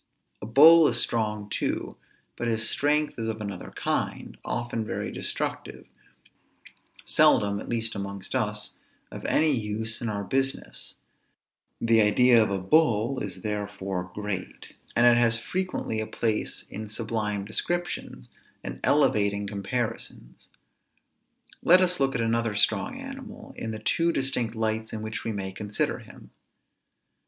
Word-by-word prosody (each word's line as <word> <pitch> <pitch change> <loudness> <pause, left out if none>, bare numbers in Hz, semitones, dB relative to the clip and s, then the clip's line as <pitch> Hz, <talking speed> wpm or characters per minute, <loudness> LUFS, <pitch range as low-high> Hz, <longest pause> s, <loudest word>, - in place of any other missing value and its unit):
A 105 - -6
bull 155 +7 +8
is 120 -1 +6
strong 105 -3 0
too; - - -2 0.4
but 120 - -3
his 110 -1 0
strength 150 -1 +1
is 115 - -2
of 110 0 -4
another 100 -4 -6
kind; - - -2
often 120 -1 -2
very - - -4
destructive, - - -4 1.2
seldom 100 -1 +3
(at - - -8
least 115 -1 -1
amongst 100 -1 -6
us) - - -1 0.4
of - - -8
any 155 0 +3
use 110 -2 -2
in 115 - -2
our 100 -1 -3
business; 135 +6 -2 0.8
the 115 -1 +4
idea 120 +3 +5
of 110 - +2
a 100 - 0
bull 115 - +2
is 130 - -5
therefore 100 -3 -3
great, 105 -3 -5 0.2
and 120 - +5
it 120 0 +6
has 115 -1 +4
frequently 180 -4 -3
a 110 - -3
place 110 -2 -1
in 110 +1 -6
sublime 105 -2 -2
descriptions, 175 +11 -3 0.4
and - - -6
elevating 100 -8 +2
comparisons. 105 - -4 1.1
Let 180 +2 +6
us 180 -2 +2
look 135 -1 +1
at 115 - 0
another 115 -1 0
strong 260 - +1
animal, 270 -4 -9
in 115 - -5
the 110 - -4
two 165 +10 +1
distinct 125 -6 -1
lights 110 0 -2
in 110 -1 -4
which 110 +1 -5
we 115 - -2
may 95 -2 -4
consider 105 +2 -2
him. - - -14
110 Hz, 140 wpm, -26 LUFS, 105-125 Hz, 1.2 s, bull